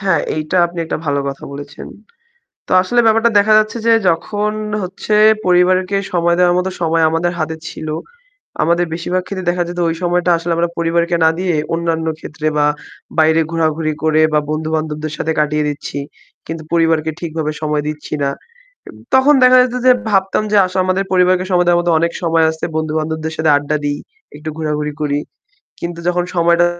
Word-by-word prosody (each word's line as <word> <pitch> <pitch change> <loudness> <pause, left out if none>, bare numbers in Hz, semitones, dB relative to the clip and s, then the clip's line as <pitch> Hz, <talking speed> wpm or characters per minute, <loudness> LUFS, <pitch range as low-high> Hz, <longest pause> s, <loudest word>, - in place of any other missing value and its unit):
হ্যাঁ, 190 -4 +1 0.2
এইটা 155 +4 -2
আপনি 170 0 -10
একটা 160 - -3
ভালো 140 0 +1
কথা 135 - -7
বলেছেন। 145 +1 -9 0.8
তো - - -9
আসলে 240 +6 0
ব্যাপারটা 225 +1 +4
দেখা 215 +1 +4
যাচ্ছে 215 +2 +1
যে - - +5 0.2
যখন 205 +5 -1 0.3
হচ্ছে, 185 +3 -4 0.3
পরিবারকে 185 +2 +3 0.2
সময় 170 -1 +2
দেওয়ার 175 -1 +4
মতো 180 +1 0
সময় 165 0 +2
আমাদের 165 +2 0
হাতে 160 0 -2
ছিল, 155 - -8 0.8
আমাদের 170 +2 +2
বেশিরভাগ 180 +2 -2
ক্ষেত্রে 185 -3 -6
দেখা 175 0 0
যেত 175 0 -6
ওই 165 - -2
সময়টা 175 0 +1
আসলে 170 +1 -4
আমরা 170 0 +1
পরিবারকে 170 +1 +1
না - - +6
দিয়ে 180 -3 0 0.2
অন্যান্য 165 -1 -1
ক্ষেত্রে 155 0 -5
বা 145 - +3 0.5
বাইরে 160 +1 +4
ঘোরাঘুরি 160 -1 0
করে 155 0 +3
বা 150 - +4
বন্ধু-বান্ধবদের 155 -1 -3
সাথে 160 - -1
কাটিয়ে 150 0 +1
দিচ্ছি। 145 0 -5 0.5
কিন্তু 160 0 -6
পরিবারকে 160 -1 +2
ঠিকভাবে 160 -2 -3
সময় 150 -1 -1
দিচ্ছি 150 0 -6
না। 140 - +1 0.6
এব - - -11 0.2
তখন 265 +3 +5
দেখা 255 0 +7
যেত 250 -1 -3
যে 255 - +8 0.2
ভাবতাম 195 0 +1
যে 210 - +4
আস 185 - -7
আমাদের 185 +1 0
পরিবারকে 185 0 +3
সময়ের 175 -1 +3
মধ্যে 175 -1 +1
অনেক 170 +1 +1
সময় 165 -1 +3
আছে, 160 - -12
বন্ধু-বান্ধবদের 160 0 -2
সাথে 160 0 +1
আড্ডা 145 +1 -1
দিই, 145 0 -2 0.4
একটু 155 +1 -6
ঘোরাঘুরি 150 -1 -2
করি। 145 -1 0 0.6
কিন্তু 170 0 -5
যখন 180 0 +1
সময়টা 170 0 +4
165 Hz, 170 wpm, -17 LUFS, 155-180 Hz, 0.8 s, যে